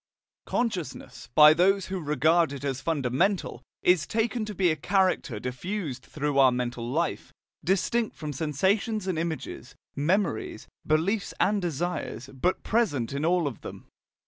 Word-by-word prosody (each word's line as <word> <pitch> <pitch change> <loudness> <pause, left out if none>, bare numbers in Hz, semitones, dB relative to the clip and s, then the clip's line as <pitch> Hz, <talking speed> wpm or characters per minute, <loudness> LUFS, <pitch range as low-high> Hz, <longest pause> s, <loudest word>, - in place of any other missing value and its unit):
"Consciousness," 180 - -3
by 150 0 +9
those 190 +3 +3
who 190 0 -4
regard 155 +2 +2
it 140 -1 -7
as 135 -2 -2
fundamental, 160 - 0 0.2
is 180 -4 +3
taken 225 0 -1
to 210 -1 -6
be 180 -2 +3
a - - 0
character 185 - +1
diffused 130 - -4
throughout 145 -1 -2
our 130 -1 +6
mental 120 -1 -3
life, 165 +6 -2 0.3
distinct 205 +5 0
from 150 -1 -5
sensations 190 - 0
and 185 -4 -1
images, 160 -4 -5 0.2
memories, 155 - -1 0.2
beliefs 180 +7 0
and 205 0 +2
desires, 165 -5 -3
but 175 +8 -1
present 145 - 0
in 140 +2 -2
all 175 0 +2
of 135 -6 -4
them. - - -9
165 Hz, 145 wpm, -27 LUFS, 140-195 Hz, 0.3 s, by